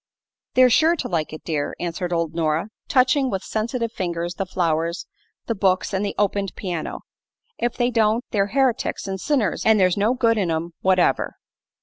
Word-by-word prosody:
"They're 255 Hz, -1 st, +6 dB
sure 315 Hz, +7 st, +4 dB
to 275 Hz, -, -4 dB
like 160 Hz, -8 st, -2 dB
it, 155 Hz, -, -9 dB
dear," 150 Hz, -3 st, -2 dB
answered 175 Hz, +1 st, -3 dB
old 165 Hz, -2 st, -1 dB
Nora, 165 Hz, +3 st, 0 dB, 0.2 s
touching 260 Hz, +1 st, +3 dB
with 195 Hz, -3 st, -3 dB
sensitive 230 Hz, +1 st, -2 dB
fingers 175 Hz, -3 st, -3 dB
the 190 Hz, +2 st, -4 dB
flowers, 170 Hz, -1 st, -1 dB, 0.4 s
the 230 Hz, -, -1 dB
books 190 Hz, -1 st, +1 dB
and 190 Hz, +1 st, 0 dB
the 200 Hz, -, -3 dB
opened 200 Hz, -2 st, 0 dB
piano. 175 Hz, -5 st, -4 dB, 0.6 s
"If 240 Hz, 0 st, -1 dB
they 245 Hz, 0 st, +1 dB
don't, 225 Hz, +1 st, +2 dB
they're 200 Hz, -2 st, +1 dB
heretics 260 Hz, -3 st, 0 dB
an' 190 Hz, 0 st, -3 dB
sinners, 255 Hz, -5 st, 0 dB
an' 220 Hz, 0 st, +5 dB
there's 185 Hz, -2 st, +3 dB
no 215 Hz, +5 st, +2 dB
good 230 Hz, -3 st, +2 dB
in 185 Hz, -4 st, 0 dB
'em 165 Hz, +1 st, -2 dB
whatever." 185 Hz, -1 st, +2 dB
195 Hz, 180 wpm, -22 LUFS, 175-235 Hz, 0.6 s, They're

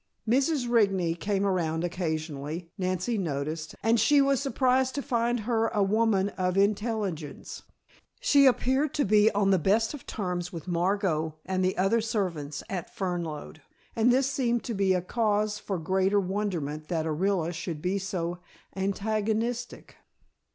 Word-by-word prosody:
Mrs. 270 Hz, +2 st, +2 dB
Rigney 195 Hz, -8 st, +2 dB
came 200 Hz, +3 st, -1 dB
around 170 Hz, -4 st, 0 dB
occasionally, 160 Hz, -2 st, -3 dB
Nancy 185 Hz, +4 st, -1 dB
noticed, 155 Hz, -1 st, -3 dB
and 225 Hz, +1 st, +3 dB
she 285 Hz, +7 st, +5 dB
was 275 Hz, -2 st, +3 dB
surprised 260 Hz, -1 st, +1 dB
to 285 Hz, -, -1 dB
find 240 Hz, -3 st, 0 dB
her 225 Hz, 0 st, +1 dB
a 210 Hz, -3 st, +1 dB
woman 205 Hz, -1 st, +2 dB
of 185 Hz, -1 st, -2 dB
intelligence. 200 Hz, -6 st, -1 dB, 0.6 s
She 280 Hz, -1 st, +5 dB
appeared 265 Hz, +3 st, +2 dB
to 290 Hz, -, +2 dB
be 210 Hz, +1 st, +5 dB
on 200 Hz, -1 st, +2 dB
the 190 Hz, -, +4 dB
best 215 Hz, -, +2 dB
of 295 Hz, -, -10 dB
terms 180 Hz, -3 st, -3 dB
with 170 Hz, 0 st, -8 dB
Margot 175 Hz, -3 st, 0 dB
and 185 Hz, 0 st, -1 dB
the 185 Hz, +1 st, 0 dB
other 195 Hz, +5 st, +2 dB
servants 170 Hz, -10 st, -3 dB
at 180 Hz, -4 st, -4 dB
Fernlode, 170 Hz, -5 st, -4 dB, 0.3 s
and 230 Hz, +2 st, +4 dB
this 260 Hz, +2 st, +3 dB
seemed 250 Hz, -3 st, 0 dB
to 235 Hz, -, -3 dB
be 190 Hz, -2 st, +2 dB
cause 210 Hz, +1 st, 0 dB
for 195 Hz, -, -3 dB
greater 190 Hz, +4 st, +1 dB
wonderment 180 Hz, -6 st, -3 dB
that 165 Hz, -3 st, -1 dB
Orilla 175 Hz, +2 st, 0 dB
should 165 Hz, -1 st, -5 dB
be 185 Hz, +5 st, -1 dB
so 180 Hz, -2 st, -3 dB, 0.4 s
antagonistic. 215 Hz, +4 st, -2 dB
195 Hz, 145 wpm, -28 LUFS, 175-225 Hz, 0.6 s, she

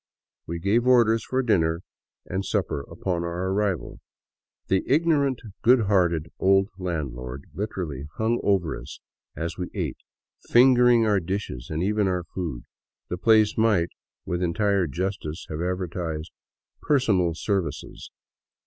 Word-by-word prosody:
We 85 Hz, -, -3 dB
gave 105 Hz, +8 st, +1 dB
orders 115 Hz, -3 st, +5 dB
for 130 Hz, +1 st, -1 dB
dinner 85 Hz, -7 st, +1 dB, 0.4 s
and 95 Hz, +2 st, -3 dB
supper 70 Hz, -, -1 dB
upon 90 Hz, -3 st, -2 dB
our 85 Hz, +2 st, -2 dB
arrival. 100 Hz, -2 st, -1 dB, 0.7 s
The 95 Hz, 0 st, +2 dB
ignorant, 140 Hz, -3 st, +2 dB, 0.2 s
good 125 Hz, +1 st, +5 dB
hearted 85 Hz, -6 st, +1 dB
old 95 Hz, +1 st, +4 dB
landlord 70 Hz, -7 st, -4 dB
literally 85 Hz, -9 st, -4 dB
hung 115 Hz, +2 st, +1 dB
over 95 Hz, -6 st, +1 dB
us -, -, -10 dB, 0.4 s
as 85 Hz, +2 st, -4 dB
we 90 Hz, -, -3 dB
ate, -, -, -2 dB, 0.5 s
fingering 125 Hz, -1 st, +6 dB
our 105 Hz, -2 st, +3 dB
dishes 95 Hz, -8 st, -4 dB
and 80 Hz, +2 st, -2 dB
even 105 Hz, +1 st, +1 dB
our 90 Hz, -1 st, 0 dB
food. 80 Hz, -6 st, -5 dB, 0.5 s
The 90 Hz, -, -2 dB
place 110 Hz, 0 st, +4 dB
might, 105 Hz, -7 st, +3 dB, 0.4 s
with 90 Hz, 0 st, -2 dB
entire 95 Hz, +1 st, +1 dB
justice, 85 Hz, 0 st, -4 dB
have 75 Hz, +1 st, -3 dB
advertised 85 Hz, -3 st, -3 dB, 0.3 s
" -, -, -50 dB
personal 100 Hz, -, +2 dB
services." 90 Hz, -5 st, -3 dB
95 Hz, 130 wpm, -25 LUFS, 85-110 Hz, 0.7 s, fingering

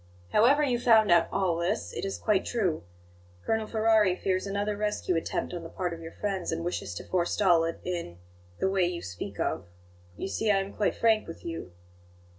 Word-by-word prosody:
"However 275 Hz, +7 st, +5 dB
you 250 Hz, -4 st, +1 dB
found 220 Hz, -4 st, +5 dB
out 170 Hz, -1 st, +5 dB
all 180 Hz, -4 st, +1 dB
this, 175 Hz, +6 st, -1 dB
it -, -, -3 dB
is 195 Hz, -, -3 dB
quite 210 Hz, -3 st, +1 dB
true. 190 Hz, -10 st, -1 dB, 0.6 s
Colonel 220 Hz, -1 st, 0 dB
Ferrari 220 Hz, -4 st, +3 dB
fears 185 Hz, +1 st, -1 dB
another 205 Hz, +1 st, -1 dB
rescue 210 Hz, -3 st, -1 dB
attempt 165 Hz, -, -2 dB
on 175 Hz, -, -4 dB
the 165 Hz, -, -8 dB
part 180 Hz, 0 st, -3 dB
of 165 Hz, -, -8 dB
your 165 Hz, 0 st, -8 dB
friends, 195 Hz, -3 st, -2 dB
and 165 Hz, +1 st, -3 dB
wishes 175 Hz, -, -3 dB
to -, -, -6 dB
forestall 175 Hz, -1 st, +3 dB
it 165 Hz, -, -4 dB
in 170 Hz, -, -4 dB, 0.4 s
the -, -, +1 dB
way 190 Hz, -2 st, +2 dB
you 175 Hz, -1 st, -4 dB
speak 90 Hz, -1 st, -7 dB
of. -, -, -1 dB, 0.5 s
You -, -, -3 dB
see, 220 Hz, +2 st, -1 dB
I 200 Hz, -, +5 dB
am 195 Hz, 0 st, -3 dB
quite 210 Hz, -, 0 dB
frank 220 Hz, -2 st, +2 dB
with 165 Hz, -, -10 dB
you." 165 Hz, -, -6 dB
190 Hz, 200 wpm, -28 LUFS, 170-215 Hz, 0.6 s, However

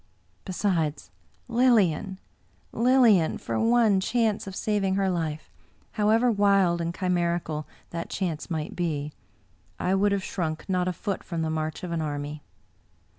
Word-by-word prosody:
Besides: 170 Hz, -, -1 dB, 0.4 s
Lilian 215 Hz, -7 st, +2 dB, 0.3 s
— -, -, -37 dB, 0.2 s
Lilian! 230 Hz, -11 st, +5 dB
for 115 Hz, -, -3 dB
one 225 Hz, -4 st, +4 dB
chance 220 Hz, 0 st, 0 dB
of 190 Hz, -, -6 dB
saving 200 Hz, -3 st, 0 dB
her 195 Hz, -1 st, +1 dB
life, 160 Hz, -3 st, -3 dB, 0.4 s
however 225 Hz, +3 st, +3 dB
wild 195 Hz, -4 st, +3 dB
and 170 Hz, 0 st, -1 dB
chimerical 170 Hz, -4 st, -1 dB, 0.2 s
that 170 Hz, 0 st, -5 dB
chance 170 Hz, -5 st, -3 dB
might 155 Hz, -3 st, -3 dB
be, 150 Hz, -4 st, -2 dB, 0.7 s
I 185 Hz, -, +1 dB
would 200 Hz, +1 st, +3 dB
have 200 Hz, -1 st, 0 dB
shrimk 160 Hz, -5 st, -3 dB
not 180 Hz, -2 st, 0 dB
a 180 Hz, -, 0 dB
foot 195 Hz, +3 st, -4 dB
from 165 Hz, -2 st, -3 dB
the 160 Hz, -, -1 dB
march 155 Hz, +1 st, -3 dB
of 180 Hz, -, -4 dB
an 165 Hz, -1 st, -1 dB
army. 145 Hz, 0 st, -4 dB
180 Hz, 145 wpm, -26 LUFS, 160-205 Hz, 0.7 s, Lilian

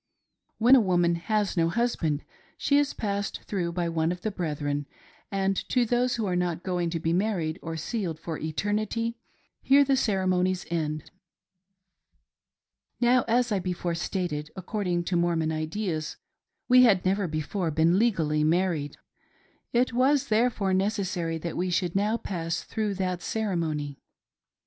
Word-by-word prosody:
When 245 Hz, +4 st, +7 dB
a 255 Hz, -, +6 dB
woman 175 Hz, -3 st, +2 dB
has 205 Hz, +4 st, -1 dB
no 165 Hz, -2 st, +2 dB
husband 170 Hz, -9 st, 0 dB, 0.3 s
she 285 Hz, 0 st, +3 dB
is 290 Hz, -1 st, +1 dB
passed 205 Hz, -1 st, -3 dB
through 175 Hz, -4 st, -2 dB
by 175 Hz, -1 st, -1 dB
one 165 Hz, 0 st, 0 dB
of 180 Hz, 0 st, -5 dB
the 215 Hz, -, -2 dB
brethren, 145 Hz, -5 st, -2 dB, 0.4 s
and 195 Hz, 0 st, +1 dB
to 250 Hz, -2 st, +3 dB
those 245 Hz, +2 st, +1 dB
who 225 Hz, -2 st, -2 dB
are 185 Hz, -2 st, 0 dB
not 175 Hz, -1 st, -1 dB
going 180 Hz, -2 st, -1 dB
to 165 Hz, 0 st, -2 dB
be 165 Hz, +1 st, 0 dB
married 180 Hz, -4 st, 0 dB
or 165 Hz, 0 st, -5 dB
sealed 170 Hz, -2 st, -3 dB
for 160 Hz, -1 st, -5 dB
eternity 215 Hz, +8 st, -2 dB, 0.4 s
here 280 Hz, +1 st, +6 dB
the 275 Hz, -1 st, +2 dB
ceremonies 185 Hz, -5 st, +1 dB
end. 155 Hz, -2 st, -2 dB, 1.9 s
Now, 245 Hz, +1 st, +4 dB
as 240 Hz, +1 st, +2 dB
I 200 Hz, -, +2 dB
before 180 Hz, -1 st, -2 dB
stated, 165 Hz, -3 st, -3 dB
according 185 Hz, -2 st, -2 dB
to 175 Hz, -, -2 dB
Mormon 170 Hz, -2 st, +1 dB
ideas, 155 Hz, 0 st, -3 dB, 0.5 s
we 255 Hz, 0 st, +7 dB
had 205 Hz, -8 st, +5 dB
never 195 Hz, +1 st, +1 dB
before 160 Hz, +3 st, -2 dB
been 160 Hz, +4 st, +3 dB
legally 160 Hz, -10 st, +2 dB
married. 160 Hz, -3 st, 0 dB, 0.7 s
It 245 Hz, +1 st, +2 dB
was 265 Hz, +3 st, +2 dB
therefore 215 Hz, -3 st, +2 dB
neces 195 Hz, 0 st, 0 dB
sary 165 Hz, -4 st, -2 dB
that 170 Hz, +1 st, -5 dB
we 180 Hz, +1 st, -1 dB
should 175 Hz, 0 st, 0 dB
now 210 Hz, +3 st, +2 dB
pass 165 Hz, -6 st, -3 dB
through 215 Hz, -2 st, -2 dB
that 185 Hz, -2 st, -2 dB
ceremony. 160 Hz, -9 st, -2 dB
185 Hz, 150 wpm, -27 LUFS, 165-215 Hz, 1.9 s, When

